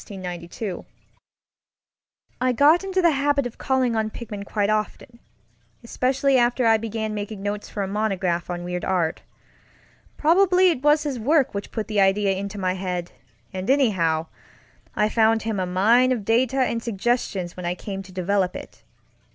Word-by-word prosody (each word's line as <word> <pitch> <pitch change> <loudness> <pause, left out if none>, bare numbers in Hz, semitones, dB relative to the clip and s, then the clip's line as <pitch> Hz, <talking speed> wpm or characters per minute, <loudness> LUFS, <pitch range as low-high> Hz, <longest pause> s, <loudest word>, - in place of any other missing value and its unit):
I 255 0 +2
got 300 +8 +5
into 380 -1 -1
the 340 - +5
habit 285 -1 +1
of 245 - -7
calling 260 -3 +1
on 220 -1 0
Pickman 210 -3 -7
quite 205 0 -1
often, 215 +2 -3 0.6
especially 265 +3 +1
after 240 +1 +2
I 225 -1 +5
began 220 -1 -4
making 205 -1 -5
notes 205 0 -4
for 205 - -3
a - - -3
monograph 190 -4 -1
on 175 0 -4
weird 180 0 -4
art. 175 -4 0 1.0
Probably 365 +3 +4
it 260 - -4
was 295 +1 +3
his 280 -5 -3
work 280 +4 +2
which 200 0 -5
put 220 -2 -4
the 210 -2 +1
idea 195 +1 +3
into 200 +1 -5
my 185 -2 0
head, 180 -2 -4 0.4
and 185 +3 -4
anyhow, 185 - +2 0.7
I 210 - +2
found 225 0 +2
him 220 -3 -2
a 185 - -1
mine 225 +8 +3
of 230 -6 -2
data 245 +4 +2
and 245 -3 +1
suggestions 205 -5 -2
when 180 -1 -5
I 175 - -1
came 195 0 -6
to 190 -1 -13
develop 185 +1 0
it. - - -10
220 Hz, 160 wpm, -23 LUFS, 195-255 Hz, 1.0 s, got